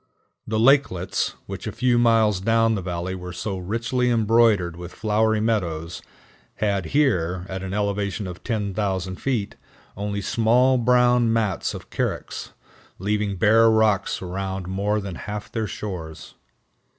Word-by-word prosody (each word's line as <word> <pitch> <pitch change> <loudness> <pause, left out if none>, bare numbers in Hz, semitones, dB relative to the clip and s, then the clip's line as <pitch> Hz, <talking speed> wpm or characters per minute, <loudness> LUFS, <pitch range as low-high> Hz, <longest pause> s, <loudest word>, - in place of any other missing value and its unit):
The 110 0 0
lakelets, 115 -8 +2
which - - -7
a - - -2
few 125 -1 +2
miles 110 -4 +3
down 115 +3 +2
the 100 - -2
valley 90 0 -3
were 90 -1 -7
so 95 +1 -4
richly 115 +6 -1
embroidered 110 -6 +3
with 85 0 -9
flowery 110 0 +1
meadows, 85 -7 -2 0.5
had 100 -4 0
here, 90 - +1
at 95 0 -5
an 95 -1 -5
elevation 100 0 -1
of 90 -1 -8
10,000 100 -4 -2
feet, 120 -7 -2 0.4
only 100 0 -3
small 120 +5 +3
brown 125 -1 +4
mats 110 -4 0
of - - -10
carex, - - -3 0.5
leaving 105 +1 -1
bare 115 +3 +5
rocks 110 -4 +2
around 95 0 -4
more 100 +3 0
than 100 -2 -5
half 105 +5 -6
their 110 -3 -2
shores. 85 -7 -7
105 Hz, 140 wpm, -23 LUFS, 95-115 Hz, 0.5 s, bare